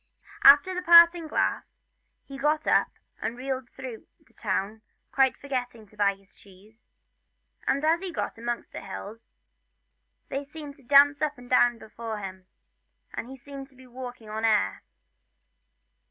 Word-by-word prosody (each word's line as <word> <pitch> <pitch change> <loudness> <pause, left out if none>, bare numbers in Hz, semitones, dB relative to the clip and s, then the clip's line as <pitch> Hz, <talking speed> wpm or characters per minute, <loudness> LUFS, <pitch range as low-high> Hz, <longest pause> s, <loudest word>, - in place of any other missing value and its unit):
After 285 +7 +8
the 360 - -3
parting 340 -1 +7
glass - - -2 0.4
he 275 - -10
got 300 +3 0
up - - +3 0.3
and 230 - -3
reeled 260 -1 -4
through 255 -4 -9 0.2
the - - -29
town, 210 +1 -3 0.3
quite 265 -1 +2
forgetting 245 -5 -5
to 210 - -23
buy 200 -1 +2
his 195 0 -25
cheese; 205 +4 -20 0.8
and 280 +3 +1
as 325 +2 +3
he 375 0 -6
got - - -4
amongst 235 0 -5
the - - -7
hills 200 +3 -9 1.0
they 275 +1 -3
seemed 295 0 -10
to 275 - -21
dance 285 +3 +5
up 300 -1 -1
and 245 0 -13
down 245 -1 +4
before 225 0 -7
him, 190 -2 -8 0.7
and 240 - -6
he 265 - -9
seemed 275 +1 -10
to 270 - -25
be 260 0 -16
walking 250 -2 -9
on 215 +1 -5
air. 215 - +2
250 Hz, 155 wpm, -27 LUFS, 220-285 Hz, 1.0 s, After